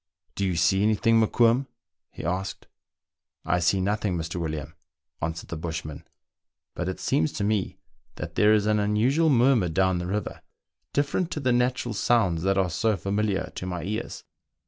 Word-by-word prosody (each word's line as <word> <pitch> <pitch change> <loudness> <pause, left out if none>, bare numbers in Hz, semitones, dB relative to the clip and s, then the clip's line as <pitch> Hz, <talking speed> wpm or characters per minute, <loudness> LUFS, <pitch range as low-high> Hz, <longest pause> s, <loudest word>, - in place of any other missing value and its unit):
"Do 100 - -1
you 90 - -1
see 95 +4 +3
any 110 +1 +3
thing, 115 +2 +3
Mokoum. 120 +4 +3 0.2
'" 85 0 -66
he - - -8
asked. 95 +3 -3 0.4
" - - -49
I - - +1
see 90 +3 +2
nothing, 100 -1 0
Mr. 80 +2 -4
William," 75 -2 -4 0.5
answered 80 +1 -4
the - - -4
bushman, 80 -2 -6 0.3
" - - -65
but 90 - -2
it 95 - -5
seems 80 - +1
to 105 - -3
me 105 -2 -1 0.4
that - - -6
there 105 0 +4
is 105 -1 +3
an 105 0 +2
unusual 120 +10 +2
murmur 125 - +4
down 95 +1 +1
the 90 - -4
river, 105 +3 -3 0.5
different 145 +5 0
to - - -3
the 130 -3 +1
natural 125 -1 0
sounds 100 -5 +2
that 95 +2 +1
are 95 -2 +1
so 110 +5 +1
familiar 100 +2 -1
to 90 - -5
my 90 -2 -4
ears." 110 +5 -4
100 Hz, 185 wpm, -26 LUFS, 90-115 Hz, 0.5 s, there